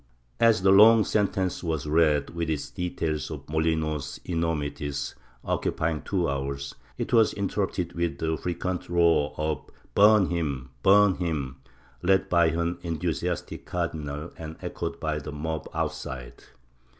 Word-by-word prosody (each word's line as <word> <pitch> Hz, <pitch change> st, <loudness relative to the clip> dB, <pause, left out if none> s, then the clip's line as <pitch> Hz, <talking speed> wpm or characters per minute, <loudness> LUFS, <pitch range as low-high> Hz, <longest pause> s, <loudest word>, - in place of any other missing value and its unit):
As 115 Hz, -5 st, +4 dB
the 95 Hz, -, +6 dB
long 110 Hz, +3 st, +8 dB
sentence 95 Hz, -4 st, 0 dB
was 80 Hz, -4 st, -2 dB
read, 75 Hz, -2 st, +2 dB
with 85 Hz, -1 st, -3 dB
its 75 Hz, -3 st, -3 dB
details 80 Hz, -3 st, -2 dB
of -, -, -7 dB
Molinos's 80 Hz, -2 st, -1 dB
enormities, 75 Hz, -4 st, -2 dB, 0.3 s
occupying 80 Hz, -1 st, -1 dB
two 90 Hz, -4 st, 0 dB
hours, 70 Hz, 0 st, -3 dB, 0.2 s
it -, -, -4 dB
was 115 Hz, -2 st, +5 dB
interrupted 95 Hz, -3 st, -2 dB
with 85 Hz, -4 st, -1 dB
the 80 Hz, +1 st, -1 dB
frequent 90 Hz, +2 st, -3 dB
roar 85 Hz, -4 st, +3 dB
of 75 Hz, 0 st, -1 dB, 0.3 s
Burn 105 Hz, -2 st, +6 dB
him! 70 Hz, -7 st, -2 dB
Burn 100 Hz, +3 st, +6 dB
him! 75 Hz, -7 st, -2 dB, 0.4 s
led 95 Hz, +1 st, +2 dB
by 85 Hz, -1 st, +4 dB
an 85 Hz, +2 st, -1 dB
enthusiastic 85 Hz, 0 st, -3 dB
cardinal 80 Hz, -3 st, -3 dB
and 80 Hz, -1 st, -7 dB
echoed 85 Hz, -1 st, -4 dB
by 75 Hz, -1 st, -1 dB
the 75 Hz, +1 st, -7 dB
mob 80 Hz, +2 st, -4 dB
outside. 65 Hz, -2 st, -4 dB
80 Hz, 135 wpm, -27 LUFS, 75-90 Hz, 0.4 s, long